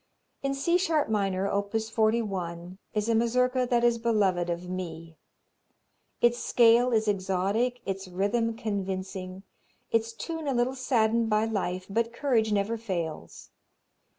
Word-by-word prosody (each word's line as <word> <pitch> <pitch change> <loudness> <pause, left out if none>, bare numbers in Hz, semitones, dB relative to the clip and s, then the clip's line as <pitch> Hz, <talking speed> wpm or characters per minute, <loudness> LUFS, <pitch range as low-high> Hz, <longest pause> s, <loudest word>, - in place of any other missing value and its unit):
In 275 0 -1
C 340 +6 +2
sharp 325 -7 +1
minor, 195 -2 0
op. 200 +2 -2
41, 200 -6 -1 0.2
is 210 +1 0
a 230 - +2
Mazurka 250 +2 +2
that 240 -1 +2
is 235 -1 +3
beloved 200 -7 +1
of 175 +1 -3
me. 165 -3 -6 1.1
Its 240 0 +3
scale 240 +1 +4
is 220 -2 +2
exotic, 200 +5 0
its 195 0 -4
rhythm 210 +5 0
convincing, 190 -2 -4 0.5
its 225 0 +1
tune 320 +5 -5
a 275 - 0
little 240 +2 +1
saddened 230 -3 +1
by 215 0 +2
life, 185 -4 -2
but 230 +3 0
courage 235 -6 +1
never 210 +3 0
fails. 175 -8 -5
220 Hz, 135 wpm, -28 LUFS, 190-235 Hz, 1.1 s, scale